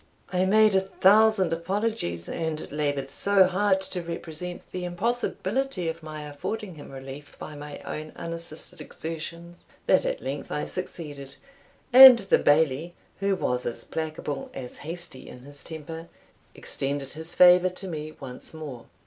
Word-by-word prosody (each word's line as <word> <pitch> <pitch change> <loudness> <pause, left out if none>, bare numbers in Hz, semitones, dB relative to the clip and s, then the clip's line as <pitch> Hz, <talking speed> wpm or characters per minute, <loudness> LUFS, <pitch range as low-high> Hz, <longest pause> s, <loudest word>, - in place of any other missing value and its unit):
I 180 +1 +2
made 215 +2 +5
a 190 - +5
thousand 195 -1 +4
apologies, 170 - -2
and 160 -1 -4
laboured 145 -2 -1
so 200 +4 +4
hard 190 +1 +2
to 185 -1 -3
represent 170 +1 -5
the 180 - -4
impossibility 235 +3 -1
of 165 +1 -6
my 155 -1 -7
affording 185 +7 -5
him 150 -3 -11
relief 135 +2 -10
by 155 - -8
my 145 0 -8
own 155 0 -5
unassisted 165 -1 -5
exertions, 170 +2 -7 0.2
that - - +4
at - - -2
length - - -5
I - - -1
succeeded, 145 -5 -6 0.6
and 260 -1 +12
the 195 -3 +2
Bailie, 155 +2 +2 0.3
who 195 0 +1
was 125 -8 -1
as 120 - -1
placable 155 -3 -4
as 125 -2 -6
hasty 165 -3 -7
in 125 - -12
his 145 +1 -9
temper, 160 +1 -8 0.5
extended 140 0 -2
his 160 +2 -4
favour 180 0 +7
to 185 +1 -8
me 155 -2 -5
once 130 +4 -3
more. 145 -7 -8
165 Hz, 150 wpm, -26 LUFS, 145-190 Hz, 0.6 s, and